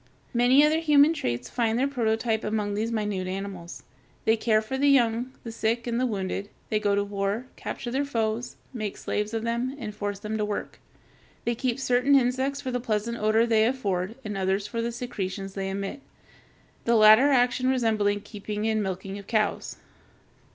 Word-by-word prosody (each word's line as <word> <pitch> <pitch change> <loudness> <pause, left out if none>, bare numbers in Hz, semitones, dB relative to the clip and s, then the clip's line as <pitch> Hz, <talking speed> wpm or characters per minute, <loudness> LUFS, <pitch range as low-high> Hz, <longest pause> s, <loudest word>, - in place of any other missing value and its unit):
Many 250 +4 +5
other 310 +1 +2
human 300 -1 +5
traits 125 - -3
find 230 -2 0
their 265 +3 +2
prototype 225 -4 0
among 210 -1 -1
these 220 +3 -1
minute 210 -4 -2
animals. 190 -2 -6 0.4
They 220 - +5
care 220 -1 +2
for 220 +4 -4
the 285 +2 +3
young, 245 -2 +3
the 230 - -6
sick, 230 +1 -1
and 240 -1 -1
the 255 - +2
wounded; 200 -1 -3 0.2
they 215 - +1
go 205 -1 +1
to 200 - +1
war, 200 +3 -2
capture 240 - -5
their 270 +3 +1
foes, 230 -3 -2 0.2
make 215 -5 -4
slaves 210 0 -2
of 225 -1 -2
them, 235 +3 -1
and 220 -6 -6
force 205 -1 -3
them 215 +2 -4
to - - +1
work. 210 0 -4 0.7
They 235 - +1
keep 250 +2 -2
certain 255 +2 +3
insects 265 +2 +1
for 260 - -3
the 250 - -1
pleasant 235 0 -2
odor 215 +2 +3
they 225 -1 +3
afford 205 -6 -1
and 210 -1 -4
others 195 +1 0
for 230 +2 -3
the 235 +1 -2
secretions 195 -5 -5
they 195 -1 -3
emit, 195 +8 -4 0.8
the 235 - +3
latter 220 +5 +7
action 255 -1 +3
resembling 215 -5 +1
keeping 210 0 -4
and 220 -1 +1
milking 195 +1 -4
cows. 215 +1 -1
220 Hz, 180 wpm, -26 LUFS, 205-245 Hz, 0.8 s, latter